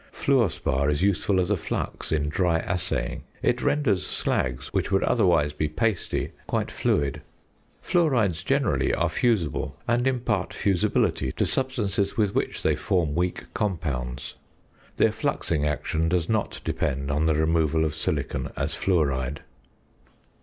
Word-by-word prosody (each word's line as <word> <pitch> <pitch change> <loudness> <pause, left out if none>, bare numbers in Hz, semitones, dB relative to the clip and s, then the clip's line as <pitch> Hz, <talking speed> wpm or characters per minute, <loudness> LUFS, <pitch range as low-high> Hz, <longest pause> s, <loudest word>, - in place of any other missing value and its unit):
Fluor 130 -7 +2
spar 70 -3 0
is 75 +4 +1
useful 100 0 +2
as 90 - 0
a - - +4
flux - - -4
in 75 -2 +1
dry 85 +2 +2
assaying; 90 +2 -2 0.2
it - - +2
renders 125 -11 +2
slags, 65 0 -1
which - - -1
would 95 - +3
otherwise 85 -10 +3
be 75 +1 -1
pasty, 105 +4 -1 0.2
quite - - -1
fluid. 70 -1 0 0.6
Fluorides 120 - +2
generally - - +1
are 85 0 +1
fusible, 80 - 0
and 120 +2 +2
impart 125 -4 -1
fusibility 90 -8 +1
to - - 0
substances 105 -7 -1
with 105 -3 +2
which - - -2
they - - +3
form 85 -6 0
weak 90 +2 -2
compounds. 70 -11 -3 0.6
Their - - +4
fluxing 75 -3 -1
action 80 +2 -1
does 85 -2 +1
not 110 -2 -1
depend 70 0 -1
on 75 +2 +1
the 80 - +3
removal 80 0 +2
of 80 - -1
silicon - - -2
as - - -1
fluoride. 70 -6 0
85 Hz, 140 wpm, -26 LUFS, 75-100 Hz, 0.6 s, a